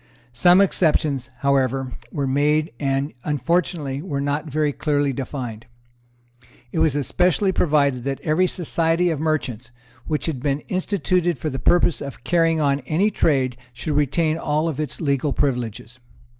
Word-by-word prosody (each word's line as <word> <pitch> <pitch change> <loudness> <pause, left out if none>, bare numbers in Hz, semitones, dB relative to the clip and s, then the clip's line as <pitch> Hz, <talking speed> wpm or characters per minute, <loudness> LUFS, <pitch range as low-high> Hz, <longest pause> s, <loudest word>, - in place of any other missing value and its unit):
Some 180 +8 +5
exceptions, 150 -8 +1
however, 135 -2 +1 0.2
were 140 - -2
made, 150 +3 +1
and, 135 +1 -1
unfortunately, 150 -1 -1
were 150 -5 -3
not 145 +2 -2
very 150 0 0
clearly 145 -2 0
defined. 125 -4 -6 1.0
It - - -2
was 150 -3 +3
especially 180 +6 +2
provided 140 -8 +2
that 135 -1 -2
every 165 +4 +2
Society 170 0 0
of 155 - -2
Merchants 130 -7 -2 0.4
which 155 -1 -1
had 150 -7 -3
been 140 +1 0
instituted 185 -3 0
for 150 +5 -3
the 135 - -4
purpose 175 -2 +3
of 140 -4 -7
carrying 165 +2 +2
on 140 -2 +2
any 190 +7 +2
trade 130 -9 +1 0.2
should 125 +6 -3
retain 155 +3 +1
all 155 +1 0
its 150 -1 -5
legal 140 -1 0
privileges. 125 -3 -2
145 Hz, 145 wpm, -22 LUFS, 135-165 Hz, 1.0 s, Some